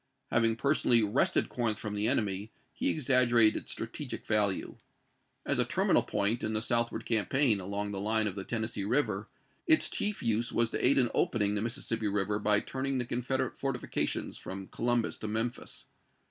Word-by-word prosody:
Having 115 -1 +3
personally 120 -3 +3
wrested 105 +5 +2
Corinth 115 -4 -1
from 105 -2 -5
the 105 +1 0
enemy, 105 -4 0 0.2
he - - 0
exaggerated 120 -6 +4
its - - -10
strategical - - -6
value. 105 -3 0 0.7
As - - 0
a - - +5
terminal - - +2
point 105 +3 -1
in 110 - -1
the 110 - 0
southward 120 -1 -1
campaign, 115 +1 +2
along 100 +2 -3
the 100 - -3
line 110 +2 +1
of 100 - -1
the 95 0 -5
Tennes 110 +1 -3
see 100 - -3
River, 105 -2 0 0.4
its 315 -1 +4
chief 210 -6 -2
use 115 0 0
was 115 -1 +1
to - - -2
aid 135 +2 +5
in 125 -3 +3
opening 105 -3 +1
the 105 - -1
Mississippi 115 -2 -2
River 105 +1 0
by 105 0 +3
turning 135 0 -2
the 125 - -1
Confederate 125 +2 -1
fortifications 135 -3 -2
from 95 0 -7
Columbus 120 0 0
to 110 - -5
Memphis. 115 +3 -4
115 Hz, 175 wpm, -31 LUFS, 105-120 Hz, 0.7 s, a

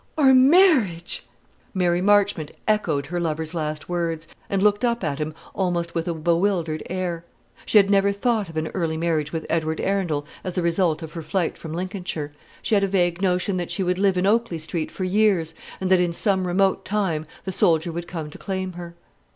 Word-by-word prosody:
"Our 270 -3 +6
marriage!" 260 - +4 0.5
Mary 175 -1 +2
Marchmont 200 -5 +3 0.2
echoed 170 -10 +1
her 175 +4 -3
lover's 160 -1 -2
last 155 -2 -3
words, 165 -2 -2 0.2
and 195 -1 0
looked 210 +1 +3
up 235 -3 +1
at 145 -3 -2
him 155 0 -3 0.2
almost 175 -3 -1
with 165 0 -2
a 170 - 0
bewildered 170 -1 0
air. 175 -2 -3 0.4
She - - +4
had 200 -1 +5
never 200 0 +4
thought 210 -1 0
of 165 - -8
an 155 0 -1
early 165 -4 -2
marriage 160 -2 0
with 160 -2 -4
Edward 160 -1 -1
Arundel 175 -7 -1 0.2
as 185 -2 -5
the 180 - 0
result 170 -1 +1
of 160 - -8
her 165 - -5
flight 170 +2 -1
from 160 -2 -8
Lincolnshire. 180 -4 -4 0.3
She - - -1
had 200 -1 +4
a - - +2
vague 175 -2 +1
notion 185 0 +1
that 175 -1 -3
she 195 - -1
would 180 0 0
live 195 -2 +3
in 180 - +1
Oakley 220 -3 +2
Street 160 0 -3
for 190 - -5
years, 185 -4 +2 0.3
and 190 0 -2
that 185 -1 +6
in 175 -1 0
some 190 0 +1
remote 190 +2 +2
time 185 -7 -1 0.2
the 190 - -2
soldier 165 -2 +2
would 170 +1 -5
come 160 -4 -6
to - - -11
claim 190 -1 -3
her. 170 -1 -9
175 Hz, 200 wpm, -23 LUFS, 165-195 Hz, 0.5 s, Our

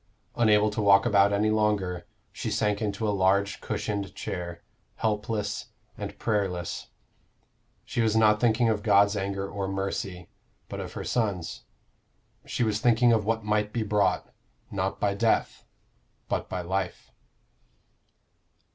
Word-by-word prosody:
Unable 105 -2 +4
to 105 - -2
walk 100 -1 +6
about 100 -1 +4
any 105 +1 +2
longer, 105 -4 0 0.2
she - - -4
sank 105 0 0
into 105 +1 -1
a 105 - +1
large 100 +1 +2
cushioned 100 -2 -3
chair, 85 -2 -5 0.3
helpless 105 -1 -2 0.3
and - - -6
prayerless. 95 -6 -2 1.0
She 120 - -1
was 110 -1 +2
not 105 -1 +5
thinking 120 0 +3
of 110 -2 +1
God's 100 +1 +4
anger 100 0 -2
or 100 -1 -3
mercy, 95 -2 -3 0.4
but - - -6
of - - -6
her - - -5
son's. 100 -8 -2 0.8
She - - -1
was 110 -2 +1
thinking 120 +1 +4
of 110 -2 +1
what 115 0 0
might 105 0 0
be 115 -1 -1
brought, 100 -3 +1 0.4
not 95 0 -2
by 100 -1 +1
death, 110 +3 0 0.6
but - - -2
by 90 - -3
life. 95 +1 -3
105 Hz, 140 wpm, -27 LUFS, 95-110 Hz, 1.0 s, walk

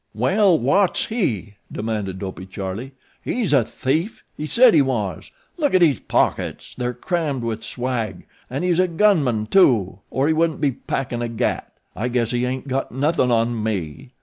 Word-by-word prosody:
"Well 185 - +3
wot's 175 +10 +2
he?" 115 - -2
demanded 105 -4 -3
Dopey 95 -1 -6
Charlie. 100 +7 -6 0.3
"He's 230 -10 -1
a 135 -4 +5
thief 155 - -2
he 150 - -5
said 240 +6 +6
he 155 - +6
was 110 - -2 0.3
look 290 - +1
in 185 - +5
his 145 -7 +3
pockets - - -1
they're 125 -1 -3
crammed 150 -2 -2
wid 115 -2 -3
swag, 120 -6 -3 0.2
an' 135 +6 -3
he's 180 -1 +2
a 185 - +4
gun 185 -1 +3
man, 110 -5 0
too, 110 - +3
or 135 - 0
he 160 - +3
wouldn't 160 0 +1
be 145 -2 +2
packin' 120 -1 -4
a 120 - -2
gat. 115 - -2 0.2
I 115 - -2
guess 120 -2 0
he 125 0 0
ain't 130 +2 -4
got 135 0 -2
nothin' 140 +1 +1
on 115 -1 +1
me." 105 - -4
130 Hz, 175 wpm, -22 LUFS, 110-160 Hz, 0.3 s, said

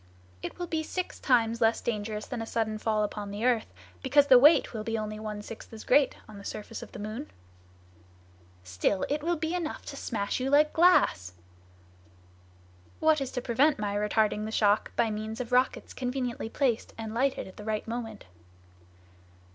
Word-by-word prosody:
"It - - -6
will 355 - -3
be 320 -2 -2
six 365 +3 -4
times 230 -3 +2
less 225 0 +3
dangerous 215 -1 -3
than 245 -3 -5
a - - -3
sudden 220 -2 -1
fall 215 -1 +1
upon 205 0 -4
the 205 +3 -3
earth, 240 -3 +1 0.3
because 280 +2 +4
the 260 -3 +8
weight 295 +1 +6
will 215 -2 -4
be 225 +1 -2
only 215 0 -4
one 210 -1 -5
sixth 225 - -10
as 220 -1 -9
great 275 +2 +4
on 210 -2 -11
the - - -11
surface 215 +2 -6
of - - -10
the - - -9
moon." 215 +8 -6 1.3
"Still 90 - 0
it 295 +1 0
will 345 +3 0
be 320 +1 -2
enough 340 -4 -3
to 280 - -7
smash 220 -6 -2
you 260 +1 -1
like 300 +2 +4
glass!" 205 - +4 1.7
"What 315 -2 +3
is 270 - -2
to 250 - -2
prevent 265 +5 +3
my 205 -1 -2
retarding 210 0 +1
the 220 - -5
shock 210 -1 +2
by 230 -2 +2
means 215 +1 -5
of 250 -1 -5
rockets 250 +1 +1
conveniently 250 -3 -3
placed, 245 -3 -1
and 220 -1 -5
lighted 265 +3 0
at 190 - -14
the 210 - -8
right 215 0 -2
moment?" 225 -2 -5
225 Hz, 185 wpm, -28 LUFS, 215-270 Hz, 1.7 s, the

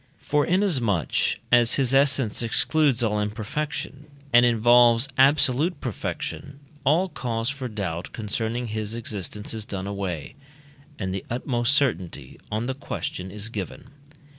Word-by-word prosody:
For 150 0 0
inasmuch 130 - +1 0.2
as 120 -1 +5
his 135 -2 +2
essence 135 -5 +3
excludes 130 +2 +2
all 105 -2 +1
imperfection, 135 +7 -4 0.3
and 120 +1 +7
involves 120 +1 +5
absolute 145 +4 +3
perfection, 145 -2 -5 0.2
all 160 +7 +3
cause 120 -7 -2
for 135 -2 -5
doubt 95 -6 -4
concerning 115 +2 -3
his 110 0 -3
existence 105 -2 -5
is 110 -1 -4
done 95 -1 -4
away, 100 -6 -4 0.6
and 95 -3 -3
the 95 - -4
utmost 120 +1 0
certainty 115 - -1
on 110 +2 -1
the 130 - -2
question 95 -8 -5
is 105 +3 -4
given. 110 +5 -7
120 Hz, 130 wpm, -25 LUFS, 105-140 Hz, 0.6 s, and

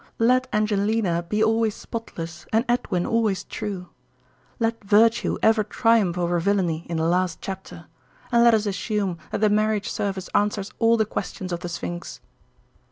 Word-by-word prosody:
Let 255 +3 +3
Angelina 210 -3 +1
be 210 +5 0
always 220 -1 +2
spotless 170 -8 -7
and 225 +3 +2
Edwin 210 -7 0
always 215 -5 +1
true. 190 -4 -6 0.7
Let 230 -1 -1
virtue 220 +3 +3
ever 220 -1 +4
triumph 215 -4 +2
over 175 0 +1
villainy 175 -3 0
in 170 - -2
the 160 - 0
last 180 0 +1
chapter; 190 0 -7 0.5
and 235 -1 +5
let 235 -1 +6
us 215 -1 0
assume 200 -3 -2
that - - -3
the 215 - +4
marriage 215 0 +1
service 195 -2 -3
answers 205 -1 0
all 230 0 +4
the 220 - +2
questions 185 -2 -5
of 170 - -2
the 175 0 -6
Sphinx. 175 0 -6
205 Hz, 160 wpm, -24 LUFS, 180-225 Hz, 0.7 s, let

